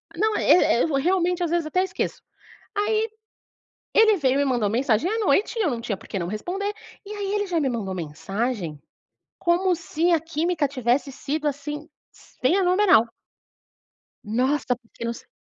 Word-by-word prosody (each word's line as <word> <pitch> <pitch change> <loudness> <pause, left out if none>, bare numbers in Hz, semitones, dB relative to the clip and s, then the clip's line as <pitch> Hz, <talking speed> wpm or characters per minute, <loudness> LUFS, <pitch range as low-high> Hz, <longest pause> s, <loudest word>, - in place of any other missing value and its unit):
Não, 430 +4 +1
eh 295 -8 +4
eh, - - +4
eu 320 - -1
realmente, 355 +3 +1
às 335 - -1
vezes, 340 -2 +1
até 365 +4 +1
esqueço. 380 - -3 0.5
Aí, 430 +2 +1 0.8
ele 440 -2 +6
veio 265 -3 +2
e - - +2
me 285 - +2
mandou 240 -6 +1
mensagem 240 - +1
à 450 - 0
noite, 415 +4 +2
eu 385 - +2
não 235 -3 -3
tinha 220 -4 -3
porque 195 - -6
não 170 - -3
responder. 375 - -3 0.3
E 415 - -9
aí 405 -1 -3
ele 410 -1 0
já 345 -3 0
me 275 - +1
mandou 210 -6 -3
mensagem, 175 - -3 0.6
como 355 +1 +2
se 335 +1 -1
a 325 - +3
química 330 -1 0
tivesse 260 +1 0
sido, 300 +3 -3
assim, 295 +2 -4 0.5
fenomenal. 360 - +4 1.2
Nnossa! 250 +4 0
Porque 235 -1 -12
não 235 - -1
sei - - -13
300 Hz, 170 wpm, -24 LUFS, 240-365 Hz, 1.2 s, ele